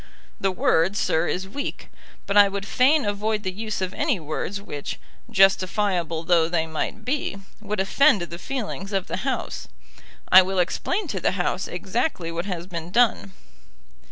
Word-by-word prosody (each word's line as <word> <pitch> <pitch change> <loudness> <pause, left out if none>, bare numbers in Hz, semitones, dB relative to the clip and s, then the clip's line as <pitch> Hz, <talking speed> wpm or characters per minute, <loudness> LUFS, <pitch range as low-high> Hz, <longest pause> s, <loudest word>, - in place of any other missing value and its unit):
The 195 - +1
word, 185 +1 +2
sir, 160 +2 +1
is 190 +1 -2
weak; 280 +9 -6 0.3
but 200 - -2
I 205 -1 +8
would 195 0 -4
fain 270 +6 +3
avoid 210 +1 -1
the 185 - -2
use 215 +1 -4
of 185 0 -2
any 285 - 0
words 160 +6 -4
which, 145 -8 -6 0.3
justifiable 190 -4 +2
though 165 -1 +3
they 165 -2 +1
might 160 +7 -4
be, 265 -6 -1 0.2
would 210 -1 -3
offend 200 - +4
the 170 0 -7
feelings 210 -5 -5
of 190 -2 0
the - - -4
House. 265 +6 -3 0.6
I 185 - +10
will 190 +1 -2
explain 360 - 0
to - - -2
the - - +1
House - - -1
exactly 175 - -2
what 170 +2 -3
has 175 -3 -4
been 170 -2 -6
done." 200 - +2
195 Hz, 165 wpm, -24 LUFS, 175-215 Hz, 0.6 s, I